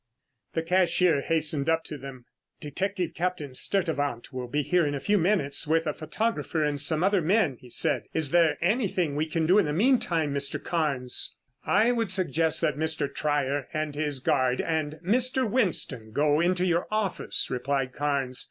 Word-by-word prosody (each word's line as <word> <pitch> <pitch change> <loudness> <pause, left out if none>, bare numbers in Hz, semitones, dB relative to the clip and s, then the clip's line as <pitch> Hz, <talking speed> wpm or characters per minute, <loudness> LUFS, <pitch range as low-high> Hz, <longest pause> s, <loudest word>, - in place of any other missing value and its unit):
The 165 - 0
cashier 175 -3 +3
hastened 155 -2 0
up 165 0 +2
to 155 - -6
them. 135 -3 -10 0.3
"Detective 180 +3 -3
Captain 170 -6 -3
Sturtevant 145 -7 -2
will 125 -1 -4
be 145 +4 -1
here 180 +4 +2
in 145 -1 -1
a - - -3
few 205 +7 +2
minutes 165 -5 0
with 160 +1 +2
a 150 - -1
photographer 165 0 -2
and 145 -1 -1
some 155 +2 0
other 195 -1 +3
men," 170 - +2
he 125 - -14
said. - - +1
"Is 155 -4 0
there 170 -2 +4
anything 185 - +1
that 140 - -5
we 155 - +1
can 160 0 -1
do 185 +6 +5
in 200 - +3
the 150 - -2
meantime, 170 - +2
Mr. 140 0 -2
Carnes?" 140 -7 -1 0.3
"I 220 +4 +4
would 230 -4 -1
suggest 165 -4 +1
that 150 -4 0
Mr. 160 -3 -1
Trier 145 -2 -1
and 155 -1 -2
his 145 -2 -1
guard 130 -2 +1
and 155 -2 -1
Mr. 255 +4 +1
Winston 160 - -1
go 150 +2 +2
into 180 +2 +2
your 175 -1 +1
office," 215 -3 -1
replied 130 0 -1
Carnes. 140 -3 -1
160 Hz, 180 wpm, -27 LUFS, 145-180 Hz, 0.3 s, do